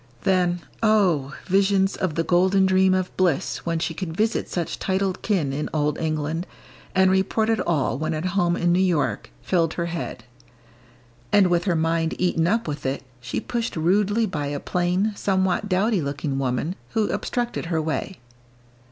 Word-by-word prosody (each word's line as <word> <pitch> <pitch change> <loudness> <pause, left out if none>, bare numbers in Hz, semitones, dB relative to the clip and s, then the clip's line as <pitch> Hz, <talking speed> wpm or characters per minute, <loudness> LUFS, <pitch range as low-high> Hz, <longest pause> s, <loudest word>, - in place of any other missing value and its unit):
Then, 180 -2 +2 0.2
oh! 180 -11 +2
visions 195 0 +2
of 185 -6 -2
the 165 - +1
golden 185 +3 +3
dream 190 0 +4
of 185 -1 -2
bliss 175 -6 0
when 165 0 +1
she 165 0 -2
could 165 -1 -5
visit 220 +2 0
such 175 -2 -3
titled 190 -1 -1
kin 170 -10 0
in 150 +2 -3
Old 150 0 0
England, 155 +2 -2 0.5
and 190 0 +5
report 200 +4 +1
it 225 - +1
all 145 -5 0
when 155 +1 -1
at 155 +3 -3
home 175 -3 +2
in 175 0 +2
New 180 - +3
York, 145 - 0
filled 165 -3 +1
her 170 - -1
head. 165 -8 -5 1.1
And 195 -3 +5
with 175 +1 +2
her 180 -4 +2
mind 165 0 0
eaten 170 -2 +1
up 225 +2 +1
with 150 -1 -4
it, 135 +1 -2 0.2
she 120 0 -3
pushed 235 -1 -3
rudely 205 +7 +2
by 150 -8 -3
a 145 0 -3
plain, 180 +6 0
somewhat 190 0 0
dowdy 195 +1 +2
looking 140 -1 -3
woman 135 +7 -1 0.2
who 220 -2 +2
obstructed 240 -6 -2
her 165 -2 0
way. 160 +4 -3
175 Hz, 170 wpm, -24 LUFS, 155-190 Hz, 1.1 s, and